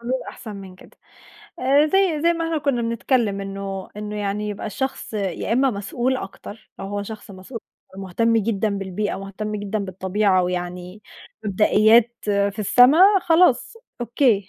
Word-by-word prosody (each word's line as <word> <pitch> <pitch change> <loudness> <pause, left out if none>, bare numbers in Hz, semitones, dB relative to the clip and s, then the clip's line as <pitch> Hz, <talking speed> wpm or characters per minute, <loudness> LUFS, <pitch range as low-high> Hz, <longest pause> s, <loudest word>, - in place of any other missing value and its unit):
حلول 255 +2 -2
أحسن 215 -4 -9
من 190 -2 -10
كده. - - -18 0.6
آآ، 275 +4 +4
زي 365 -2 +2
زي 340 +1 +4
ما 335 -1 -3
إحنا 330 -1 -1
كُنا 275 -5 0
بنتكلم 230 -3 0
إنه 195 -1 -5
إنه 210 0 -5
يعني 205 +1 -2
يبقى 205 -1 -5
الشخص 265 +2 -4
يا 200 0 -2
إما 265 +3 +3
مسؤول 240 +5 -2
أكتر، 205 0 -10
لو - - -6
هو 205 +1 -3
شخص 215 0 -9
مسؤ 190 +6 -9 0.4
ومهتم 195 +5 0
جدًا 220 -1 0
بالبيئة، 195 +2 -3
مهتم 200 +2 -5
جدًا 205 +1 -3
بالطبيعة، 190 0 +1
ويعني 180 +2 -4 0.4
مبدئيات 215 +3 +4
في 200 -1 0
السما 245 - +5 0.2
خلاص 330 - +3 0.3
أوكي، 235 -4 +1
210 Hz, 150 wpm, -22 LUFS, 195-245 Hz, 0.6 s, السما